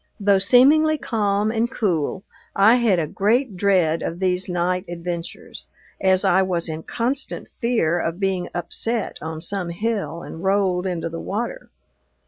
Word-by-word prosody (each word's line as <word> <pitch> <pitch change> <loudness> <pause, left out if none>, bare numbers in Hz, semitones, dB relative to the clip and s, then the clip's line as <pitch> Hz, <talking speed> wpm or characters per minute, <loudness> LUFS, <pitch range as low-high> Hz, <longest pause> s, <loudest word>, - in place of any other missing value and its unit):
Though 200 -1 +3
seemingly 290 +9 +5
calm 210 -4 0
and 230 +1 0
cool, 190 - -1 0.3
I 215 +5 +6
had 230 -6 +3
a 165 - 0
great 215 - 0
dread 180 -4 +2
of 165 - -3
these 185 0 0
night 180 +1 0
adventures, 170 0 -6 0.3
as 190 -1 +3
I 190 +2 +4
was 180 -3 -1
in 160 0 -5
constant 250 - -3
fear 225 -9 0
of 170 +1 -3
being 190 -2 -1
upset 220 +6 -2
on 160 0 -5
some 190 -1 -3
hill 170 -4 -3
and 165 - -9
rolled 190 -2 +1
into 175 -3 -2
the 165 0 -6
water. 235 - -4
190 Hz, 150 wpm, -22 LUFS, 175-220 Hz, 0.3 s, I